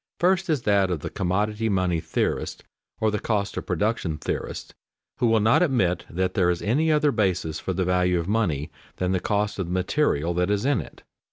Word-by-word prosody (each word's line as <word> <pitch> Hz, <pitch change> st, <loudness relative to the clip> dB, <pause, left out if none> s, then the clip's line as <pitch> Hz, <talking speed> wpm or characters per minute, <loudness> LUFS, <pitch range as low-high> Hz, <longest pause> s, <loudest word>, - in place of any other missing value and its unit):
First 185 Hz, +1 st, +2 dB
is 145 Hz, -6 st, +1 dB
that 100 Hz, -2 st, +3 dB
of 85 Hz, -5 st, -2 dB
the -, -, -5 dB
commodity 105 Hz, +4 st, -1 dB
money 90 Hz, -4 st, +1 dB
theorists, -, -, -2 dB, 0.4 s
or 110 Hz, -1 st, +2 dB
the 105 Hz, -, -1 dB
cost 100 Hz, -3 st, -1 dB
of -, -, -5 dB
production 90 Hz, -3 st, -1 dB
theorists, -, -, -5 dB, 0.5 s
who 120 Hz, -, +3 dB
will 115 Hz, -1 st, +4 dB
not 110 Hz, +8 st, +4 dB
admit 120 Hz, -, +1 dB
that 90 Hz, +2 st, -1 dB
there 90 Hz, -4 st, +2 dB
is 90 Hz, -1 st, -1 dB
any 150 Hz, +10 st, +2 dB
other 150 Hz, -1 st, +3 dB
basis 90 Hz, -, 0 dB
for 95 Hz, -, -3 dB
the 95 Hz, +1 st, 0 dB
value 90 Hz, -1 st, +2 dB
of 85 Hz, -, -4 dB
money 85 Hz, -9 st, 0 dB, 0.2 s
than 90 Hz, 0 st, -1 dB
the 95 Hz, -, +1 dB
cost 105 Hz, +2 st, -1 dB
of 95 Hz, -, -2 dB
the -, -, -5 dB
material 90 Hz, -, +1 dB
that 90 Hz, +2 st, 0 dB
is 105 Hz, +2 st, 0 dB
in 140 Hz, -4 st, +2 dB
it. -, -, -14 dB
100 Hz, 205 wpm, -25 LUFS, 90-115 Hz, 0.5 s, will